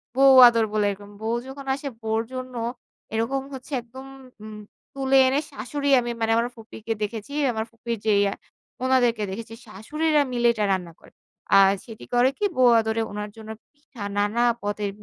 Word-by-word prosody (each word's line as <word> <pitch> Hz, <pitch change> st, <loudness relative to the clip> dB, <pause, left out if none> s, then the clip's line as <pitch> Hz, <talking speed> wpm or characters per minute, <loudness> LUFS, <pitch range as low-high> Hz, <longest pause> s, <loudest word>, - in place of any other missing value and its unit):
বউ 270 Hz, 0 st, +6 dB
আদর 230 Hz, -2 st, +3 dB
বলে 210 Hz, -1 st, +1 dB
এরকম। 200 Hz, +1 st, -10 dB
বউ 225 Hz, +2 st, -1 dB
যখন 270 Hz, +1 st, -9 dB
আসে 280 Hz, +1 st, -5 dB
বউর 220 Hz, 0 st, 0 dB
জন্য 255 Hz, 0 st, -6 dB, 0.6 s
এরকম 230 Hz, +5 st, -1 dB
হচ্ছে 265 Hz, +2 st, -10 dB
একদম 255 Hz, +3 st, -12 dB, 0.9 s
তুলে 270 Hz, 0 st, +2 dB
এনে 270 Hz, +2 st, +2 dB
শাশুড়ি 280 Hz, +6 st, -3 dB
আমি 240 Hz, -1 st, -3 dB
মানে 225 Hz, -, +1 dB
আমার 235 Hz, +1 st, +1 dB
ফুপিকে 225 Hz, 0 st, -6 dB
দেখেছি 215 Hz, +3 st, -5 dB, 0.2 s
আমার 220 Hz, -1 st, -3 dB
ফুপির 230 Hz, 0 st, -5 dB
যে 215 Hz, -, +3 dB, 0.7 s
ওনাদেরকে 245 Hz, -4 st, +2 dB
দেখেছি 225 Hz, +3 st, -7 dB
শাশুড়িরা 300 Hz, +9 st, 0 dB
মিলে 240 Hz, -1 st, +2 dB
এটা 215 Hz, -2 st, -1 dB
রান্না 180 Hz, -3 st, -2 dB
করে। -, -, -19 dB, 0.5 s
আর 195 Hz, 0 st, +7 dB
সেটি 225 Hz, -2 st, -11 dB
করে 245 Hz, +2 st, +4 dB
কি 415 Hz, -, 0 dB
বৌ 255 Hz, -, +4 dB, 0.2 s
আদরে 220 Hz, 0 st, -1 dB
ওনার 210 Hz, 0 st, -5 dB
জন্য 220 Hz, -1 st, -11 dB, 0.2 s
পিঠা 285 Hz, -6 st, -16 dB, 0.2 s
নানা 205 Hz, +3 st, +1 dB, 0.2 s
পদের 205 Hz, 0 st, -2 dB
230 Hz, 165 wpm, -24 LUFS, 215-260 Hz, 0.9 s, আর